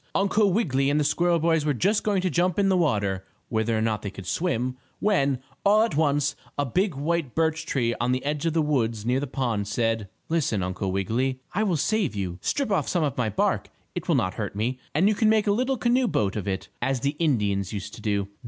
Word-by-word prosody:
Uncle 200 Hz, +1 st, +3 dB
Wiggily 140 Hz, -, +1 dB
and 145 Hz, +1 st, +2 dB
the -, -, +2 dB
squirrel 170 Hz, +4 st, +2 dB
boys 160 Hz, -1 st, +2 dB
were 150 Hz, -2 st, +1 dB
just 200 Hz, -, +2 dB
going 200 Hz, -3 st, +1 dB
to 185 Hz, -, +2 dB
jump 175 Hz, 0 st, +1 dB
in 200 Hz, -1 st, +3 dB
the 190 Hz, -, +3 dB
water, 100 Hz, -, +1 dB, 0.3 s
whether 110 Hz, 0 st, 0 dB
or 110 Hz, -, 0 dB
not 110 Hz, -2 st, 0 dB
they 100 Hz, -, -4 dB
could 100 Hz, -1 st, -10 dB
swim, 130 Hz, -, -1 dB, 0.2 s
when, 140 Hz, -11 st, +2 dB, 0.3 s
all 210 Hz, +2 st, +5 dB
at 230 Hz, -, -1 dB
once, 145 Hz, -1 st, +2 dB, 0.2 s
a 145 Hz, -, +1 dB
big 180 Hz, -, 0 dB
white 150 Hz, -1 st, -1 dB
birch 160 Hz, 0 st, 0 dB
tree 120 Hz, -3 st, +1 dB
on 120 Hz, +1 st, +1 dB
the 130 Hz, +2 st, -1 dB
edge 150 Hz, +2 st, -1 dB
of 165 Hz, -, 0 dB
the 160 Hz, -1 st, +2 dB
woods 115 Hz, -7 st, 0 dB
near 125 Hz, +2 st, +2 dB
the 145 Hz, -, -3 dB
pond, 120 Hz, -6 st, -1 dB
said: 115 Hz, -1 st, -1 dB, 0.2 s
"Listen, 140 Hz, -, 0 dB
Uncle 95 Hz, +1 st, -2 dB
Wiggily 110 Hz, +8 st, 0 dB
and 130 Hz, -1 st, -6 dB
I 195 Hz, -, 0 dB
will 190 Hz, -6 st, +1 dB
save 195 Hz, -, 0 dB
you. 90 Hz, -3 st, -3 dB
Strip 275 Hz, -6 st, -1 dB
off 195 Hz, -, +1 dB
some 175 Hz, -3 st, +1 dB
of 140 Hz, -5 st, -1 dB
my 120 Hz, -3 st, 0 dB
bark. 105 Hz, -, 0 dB, 0.2 s
It -, -, -5 dB
will -, -, +3 dB
not 95 Hz, 0 st, +1 dB
hurt 105 Hz, -3 st, -4 dB
me, 120 Hz, +5 st, -1 dB, 0.2 s
and 175 Hz, +6 st, +4 dB
you 215 Hz, -, +4 dB
can 215 Hz, +1 st, +2 dB
make 220 Hz, -1 st, +3 dB
a 205 Hz, -, +3 dB
little 255 Hz, +5 st, +1 dB
canoe 245 Hz, +2 st, +2 dB
boat 100 Hz, -, 0 dB
of 105 Hz, -2 st, -3 dB
it, 95 Hz, -1 st, -2 dB
as 130 Hz, 0 st, 0 dB
the 140 Hz, +1 st, 0 dB
Indians 105 Hz, -, +1 dB
used 100 Hz, -1 st, -5 dB
to -, -, -10 dB
do. 100 Hz, -2 st, 0 dB
140 Hz, 240 wpm, -25 LUFS, 110-175 Hz, 0.3 s, all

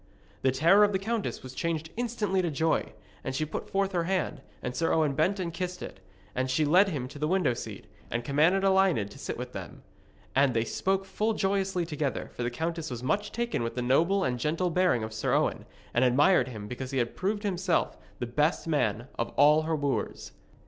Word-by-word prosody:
The 130 Hz, -, +3 dB
terror 170 Hz, +10 st, +5 dB
of 205 Hz, 0 st, +3 dB
the -, -, +3 dB
countess 220 Hz, +2 st, -3 dB
was 130 Hz, 0 st, -8 dB
changed 160 Hz, +1 st, -2 dB
instantly 220 Hz, -5 st, -1 dB
into 175 Hz, -2 st, +1 dB
joy, 160 Hz, +2 st, 0 dB, 0.3 s
and 130 Hz, -, -3 dB
she 155 Hz, -, 0 dB
put 150 Hz, -, -6 dB
forth 195 Hz, 0 st, 0 dB
her 175 Hz, -3 st, 0 dB
hand, 170 Hz, -6 st, -1 dB, 0.2 s
and 125 Hz, 0 st, -3 dB
Sir 165 Hz, +5 st, +1 dB
Owen 155 Hz, -3 st, +2 dB
bent 185 Hz, +8 st, +1 dB
and 170 Hz, -3 st, -3 dB
kissed 180 Hz, +1 st, -4 dB
it, -, -, -8 dB, 0.3 s
and 130 Hz, +1 st, -1 dB
she 150 Hz, +4 st, +2 dB
led 185 Hz, +7 st, +5 dB
him 135 Hz, -8 st, -3 dB
to 145 Hz, +2 st, -11 dB
the 150 Hz, -, 0 dB
window 175 Hz, -7 st, +2 dB
seat, -, -, -7 dB, 0.2 s
and 120 Hz, 0 st, -2 dB
commanded 160 Hz, +9 st, +3 dB
Elined 190 Hz, -, +3 dB
to -, -, -12 dB
sit -, -, -4 dB
with -, -, -6 dB
them. -, -, -8 dB, 0.5 s
And 135 Hz, -2 st, +4 dB
they 115 Hz, -, +3 dB
spoke 195 Hz, +9 st, 0 dB
full 215 Hz, +3 st, -1 dB
joyously 195 Hz, -3 st, 0 dB
together, 150 Hz, -4 st, -3 dB
for -, -, -6 dB
the 120 Hz, -, 0 dB
countess 165 Hz, +5 st, -3 dB
was 120 Hz, -1 st, -6 dB
much 205 Hz, +10 st, 0 dB
taken 235 Hz, -, -1 dB
with 115 Hz, 0 st, -3 dB
the 125 Hz, -, -1 dB
noble 170 Hz, +10 st, +3 dB
and 125 Hz, -1 st, -1 dB
gentle 165 Hz, +6 st, 0 dB
bearing 180 Hz, -10 st, +2 dB
of 110 Hz, 0 st, -5 dB
Sir 110 Hz, -, 0 dB
Owen, -, -, 0 dB, 0.3 s
and 120 Hz, -, +3 dB
admired 130 Hz, +3 st, +4 dB
him 110 Hz, -5 st, -7 dB
because 125 Hz, +3 st, -5 dB
he 135 Hz, -, -3 dB
had 120 Hz, -2 st, -1 dB
proved 205 Hz, +3 st, -1 dB
himself 185 Hz, -3 st, 0 dB, 0.2 s
the 120 Hz, -, -3 dB
best 150 Hz, +7 st, +1 dB
man 120 Hz, -6 st, 0 dB
of 115 Hz, -, 0 dB
all 150 Hz, +2 st, +6 dB
her 160 Hz, -, +2 dB
wooers. 145 Hz, -2 st, -2 dB
160 Hz, 215 wpm, -28 LUFS, 130-190 Hz, 0.5 s, all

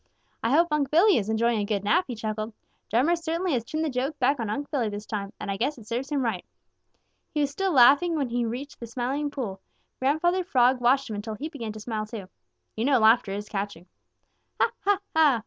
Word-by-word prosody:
"I 225 Hz, -, 0 dB
hope 335 Hz, +6 st, +4 dB
Unc' 295 Hz, -3 st, +1 dB
Billy 360 Hz, +6 st, +5 dB
is 210 Hz, -2 st, -1 dB
enjoying 225 Hz, +1 st, +2 dB
a -, -, 0 dB
good 205 Hz, -1 st, -1 dB
nap," 335 Hz, -, +3 dB
he 245 Hz, -, -4 dB
chuckled. 215 Hz, 0 st, -4 dB, 0.4 s
"Drummer 265 Hz, +10 st, +3 dB
certainly 335 Hz, +1 st, -2 dB
has 240 Hz, -3 st, 0 dB
turned 310 Hz, +7 st, -2 dB
the -, -, 0 dB
joke 265 Hz, +4 st, -2 dB
back 275 Hz, +1 st, +2 dB
on 225 Hz, -3 st, -2 dB
Unc' 280 Hz, +7 st, -4 dB
Billy 250 Hz, -7 st, 0 dB
this 205 Hz, 0 st, -6 dB
time, 200 Hz, -2 st, -4 dB
and 205 Hz, -, -4 dB
I 195 Hz, -, -2 dB
guess 270 Hz, +7 st, -1 dB
it 225 Hz, -, -13 dB
serves 245 Hz, +4 st, -3 dB
him 280 Hz, -3 st, +1 dB
right." 205 Hz, -6 st, -2 dB, 0.9 s
He 300 Hz, -, +2 dB
was 285 Hz, -1 st, 0 dB
still 385 Hz, +5 st, -1 dB
laughing 290 Hz, +5 st, +6 dB
when 280 Hz, -5 st, -1 dB
he 240 Hz, +1 st, 0 dB
reached 250 Hz, +5 st, -5 dB
the 235 Hz, -, -7 dB
Smiling 260 Hz, +5 st, -2 dB
Pool. 220 Hz, -10 st, -5 dB, 0.4 s
Grandfather 345 Hz, +7 st, +2 dB
Frog 255 Hz, -6 st, +3 dB
watched 265 Hz, +3 st, +3 dB
him 220 Hz, -, -4 dB
until 215 Hz, +1 st, -5 dB
he 300 Hz, +8 st, -5 dB
began 235 Hz, -8 st, -6 dB
to 215 Hz, -, -8 dB
smile 215 Hz, -1 st, -4 dB
too. 210 Hz, -4 st, -7 dB, 0.5 s
You 225 Hz, -, -1 dB
know 275 Hz, -1 st, +4 dB
laughter 220 Hz, -2 st, +4 dB
is 205 Hz, +1 st, -4 dB
catching. 200 Hz, -4 st, -4 dB, 0.7 s
"Ha, -, -, +3 dB
ha, 405 Hz, -1 st, +3 dB, 0.2 s
ha! 300 Hz, -7 st, +5 dB
245 Hz, 225 wpm, -26 LUFS, 220-295 Hz, 0.9 s, laughing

